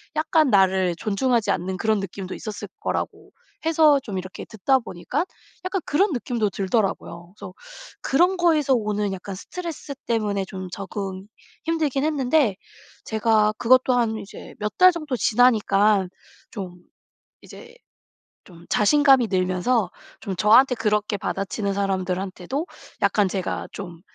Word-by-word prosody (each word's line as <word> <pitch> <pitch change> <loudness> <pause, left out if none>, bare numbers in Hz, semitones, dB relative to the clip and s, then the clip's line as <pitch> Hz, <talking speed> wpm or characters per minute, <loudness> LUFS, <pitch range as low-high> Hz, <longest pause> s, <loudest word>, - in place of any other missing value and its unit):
약간 310 -1 +2
나를 190 -3 +3
존중하지 230 +2 0
않는 185 +2 -2
그런 220 +1 +1
느낌도 190 0 -6
있었을 215 -1 -7
거라고 - - -4 0.3
해서 310 -3 +4
좀 205 -6 -5
이렇게 185 0 -7
듣다 260 +5 +1
보니까 240 - -3 0.4
약간 370 +1 -1
그런 375 +6 +2
느낌도 240 -5 -1
들더라구요. 190 -3 -2
그래서 185 -2 -9 0.5
그런 355 +7 +3
거에서 315 -6 +3
오는 210 -3 -1
약간 190 +1 -7
스트레스 320 - -7
때문에 210 -4 0
좀 185 -1 -7
적응이 195 0 -6 0.4
힘들긴 305 -4 0
했는데 275 -7 +2 0.9
제가 215 - +1
그것도 255 +1 +4
한 230 -3 +1
이제 200 -1 -10
몇 210 0 -3
달 370 0 +8
정도 305 -6 -4
지나니까 215 -5 +3 0.4
좀 185 -4 -7 0.7
이제 470 0 -13 0.7
좀 170 -2 -16
자신감이 270 +2 +4
늘면서 185 +3 +1 0.3
좀 190 -2 -4
저한테 250 +5 +5
그렇게 210 -2 0
받아치는 200 +1 -3
사람들한테도 190 - -2 0.4
약간 205 -2 +3
제가 185 -1 -3
좀 175 -4 -8
210 Hz, 305 characters per minute, -23 LUFS, 190-270 Hz, 0.9 s, 달